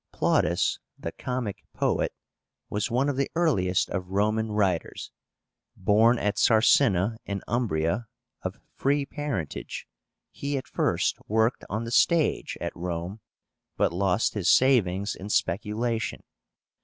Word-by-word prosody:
PLAUTUS, - - +1 0.2
the - - -5
comic 125 -5 -4
poet, - - +1 0.6
was 105 +3 -1
one 130 +4 +1
of 140 -2 -1
the 140 - 0
earliest 100 - +2
of 90 -2 -3
Roman 110 +3 +1
writers. 95 -5 -1 0.6
Born 110 +5 +4
at 105 -2 -1
Sarsina 110 -2 +4
in 100 -1 -3
Umbria, 105 -2 0 0.3
of - - -4 0.2
free 140 +1 +1
parentage, 140 - -4 0.4
he 140 0 -3
at 130 - -5
first - - 0
worked 110 +3 +1
on 110 +3 -2
the 115 - -5
stage 165 +5 +2
at - - -4
Rome, 90 +3 -4 0.6
but - - +2
lost 95 +3 +1
his 95 -3 0
savings 105 -7 +3
in 100 +3 -8
speculation. 110 +5 -1
110 Hz, 125 wpm, -27 LUFS, 95-125 Hz, 0.6 s, Born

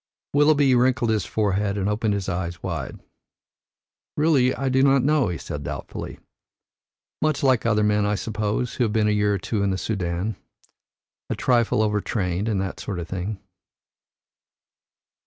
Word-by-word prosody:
Willoughby 145 -2 +4
wrinkled 125 -1 +2
his 105 -5 0
forehead 100 -1 0
and 100 0 -1
opened 105 0 0
his 100 -2 -3
eyes 85 -1 -3
wide. 80 -7 -4 1.2
"Really, 145 -5 +3
I 135 +1 -2
do 130 0 +3
not 135 -1 +4
know," 150 -1 +3
he 85 - -3
said 75 - -6
doubtfully. - - -6 1.0
"Much 155 -2 0
like 130 -4 +3
other 105 -2 +2
men, 105 0 +2
I 105 0 +1
suppose, 110 +3 -2
who 125 - 0
have 110 -3 0
been 110 -2 +2
a - - +3
year 105 -1 +2
or - - 0
two 100 +2 -2
in 100 - +1
the 95 - 0
Soudan, 95 0 -2 0.9
a - - -1
trifle 120 -3 +2
overtrained 105 -2 -1
and 105 -3 0
that 95 0 -4
sort 100 - -4
of 85 -1 -5
thing." 95 +2 -4
105 Hz, 160 wpm, -24 LUFS, 95-125 Hz, 1.2 s, Willoughby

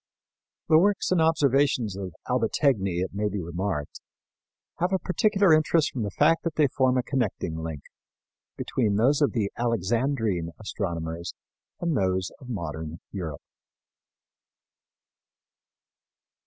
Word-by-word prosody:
The 155 0 +6
works 200 +2 +2
and 180 -3 +3
observations 140 -8 +2
of 95 -4 -6
Albategni, 110 - +1
it 95 - -5
may 105 +1 0
be 100 0 -3
remarked, 85 -3 -4 0.8
have 180 +2 +1
a 190 - +3
particular 195 -1 +3
interest 155 0 +3
from 125 - -3
the 105 - -1
fact 165 +11 +3
that 165 - -2
they 150 - +4
form 130 0 +2
a 125 - +1
connecting 110 - -2
link 80 -3 -5 0.7
between 110 -6 0
those 135 +8 +3
of 145 - +3
the 105 -4 0
Alexandrine 115 - 0
astronomers 85 -5 -4 0.4
and 170 -3 0
those 95 -2 0
of 130 - -12
modern 80 -6 -5
Europe. 80 -7 -5
110 Hz, 125 wpm, -26 LUFS, 90-145 Hz, 0.8 s, The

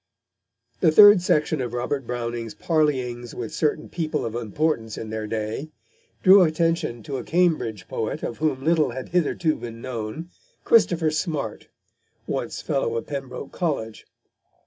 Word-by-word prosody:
The 160 - +4
third 205 +2 +9
section 155 -5 +1
of 120 -2 -4
Robert 125 +1 -2
Browning's 120 -2 -4
Parleyings 130 -7 -1
with 115 -3 -5
certain 155 0 0
People 160 -7 -2
of 115 - -4
Importance 115 0 -1
in 110 - -6
their 110 -1 -3
Day 110 +7 -3 0.5
drew 190 +1 +8
attention 165 -8 +1
to 135 +3 -4
a 125 - -5
Cambridge 155 - 0
poet 110 - -3
of 115 - -4
whom 150 -4 0
little 160 -2 +3
had 130 +2 -6
hitherto 165 -2 +1
been 115 -1 -8
known, 125 +7 -6 0.3
Christopher 170 - +3
Smart, 150 - -3 0.6
once - - -4
fellow 115 -4 -1
of 115 - -4
Pembroke 135 -1 -6
College. 140 -11 -3
135 Hz, 145 wpm, -24 LUFS, 115-160 Hz, 0.6 s, third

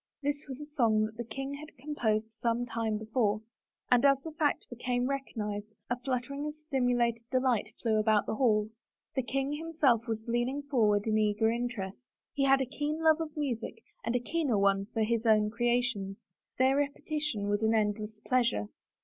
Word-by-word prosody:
This 290 +1 -2
was 265 - -6
a 295 - -6
song 230 -8 +2
that 215 0 -7
the 235 - -3
king 270 +4 -5
had 305 +3 -9
composed 225 -6 -1
some 235 +1 -1
time 225 -2 -1
before, 215 -1 0 0.5
and 245 -1 +5
as 275 -1 +6
the 320 - -6
fact 300 -1 0
became 245 +1 -1
recognized 210 -7 -3 0.2
a 245 - 0
flut 250 -1 -1
tering 280 +3 -5
of 300 - -5
stimulated 245 -6 +1
delight 255 -5 +2
flew 220 -2 +2
about 215 -1 +3
the - - -2
hall. 215 -3 +2 0.4
The 265 - +1
king 270 +3 -1
himself 295 -7 +1
was 220 -1 -3
leaning 240 +4 0
forward 215 -7 +2
in 215 -1 +2
eager 215 +1 +2
interest. 235 -1 -4 0.2
He 275 - +1
had 270 0 +5
a - - +1
keen 295 +4 -3
love 315 -1 +6
for 325 -1 -2
music 250 -6 -3 0.2
and 235 - -1
a - - +3
keener 275 -2 0
one 195 0 +2
for 225 - +1
his 230 +1 0
own 215 -1 +4
creations; 235 -4 0 0.4
their 265 +1 +4
repetition 290 -5 -1
was 205 +1 +1
an 220 0 +3
endless 210 0 -1
pleasure. 235 - +1
240 Hz, 185 wpm, -31 LUFS, 215-275 Hz, 0.5 s, as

